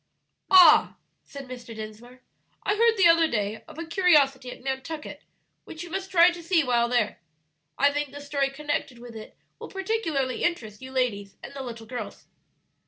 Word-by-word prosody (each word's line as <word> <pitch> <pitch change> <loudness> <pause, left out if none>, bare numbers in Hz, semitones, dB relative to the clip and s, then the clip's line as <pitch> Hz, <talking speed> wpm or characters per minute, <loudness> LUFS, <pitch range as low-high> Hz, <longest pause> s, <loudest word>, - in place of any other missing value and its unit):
"Ah," 360 -5 +7 0.3
said 280 -2 -10
Mr. 245 -2 -9
Dinsmore, 220 +4 -10 0.4
"I - - +1
heard 455 +1 +3
the 380 - +4
other 330 -1 +5
day 210 -4 -3
of - - -13
a 330 - -5
curiosity 295 -7 +3
at - - -12
Nantucket 290 +3 -5 0.4
which 320 +1 -9
we 350 - -10
must 385 +2 -4
try 355 -1 +6
to 345 0 -9
see 335 -1 +2
while 240 -2 +1
there. 240 -4 0 0.6
I 280 +1 +3
think 290 -2 -2
the 285 - -9
story 285 -1 -1
connected 285 -2 -4
with 235 -1 -12
it 215 -1 -11 0.2
will - - -9
particularly 370 - -2
interest 220 -12 -2
you 260 0 -9
ladies 210 -7 -2
and - - -9
the 275 - -6
little 230 -3 -8
girls." 225 -2 -7
275 Hz, 175 wpm, -26 LUFS, 240-330 Hz, 0.6 s, Ah